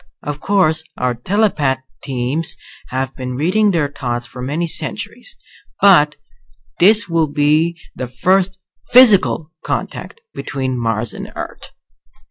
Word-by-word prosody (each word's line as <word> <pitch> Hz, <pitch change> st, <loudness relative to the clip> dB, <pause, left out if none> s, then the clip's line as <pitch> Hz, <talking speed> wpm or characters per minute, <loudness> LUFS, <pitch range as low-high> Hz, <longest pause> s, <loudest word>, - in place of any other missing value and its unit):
Of 145 Hz, 0 st, -4 dB
course 160 Hz, -4 st, +2 dB
our 125 Hz, -1 st, 0 dB
telepath 145 Hz, -, 0 dB, 0.2 s
teams 135 Hz, +4 st, -1 dB, 0.3 s
have 130 Hz, +1 st, -3 dB
been 125 Hz, -1 st, -5 dB
reading 185 Hz, +10 st, +2 dB
their 165 Hz, -6 st, +1 dB
thoughts 120 Hz, -4 st, -4 dB
for 125 Hz, +1 st, -10 dB
many 150 Hz, +7 st, -1 dB
centuries, 485 Hz, -, -4 dB, 0.4 s
but -, -, +6 dB, 0.6 s
this 210 Hz, +4 st, +5 dB
will 165 Hz, -2 st, +1 dB
be 155 Hz, +3 st, +1 dB, 0.2 s
the 125 Hz, -, -4 dB
first 185 Hz, +9 st, +1 dB, 0.3 s
physical 205 Hz, -10 st, +5 dB
contact -, -, -4 dB
between 130 Hz, -2 st, -3 dB
Mars 115 Hz, -2 st, -1 dB
and -, -, -8 dB
Earth." -, -, -7 dB
150 Hz, 120 wpm, -18 LUFS, 130-180 Hz, 0.6 s, but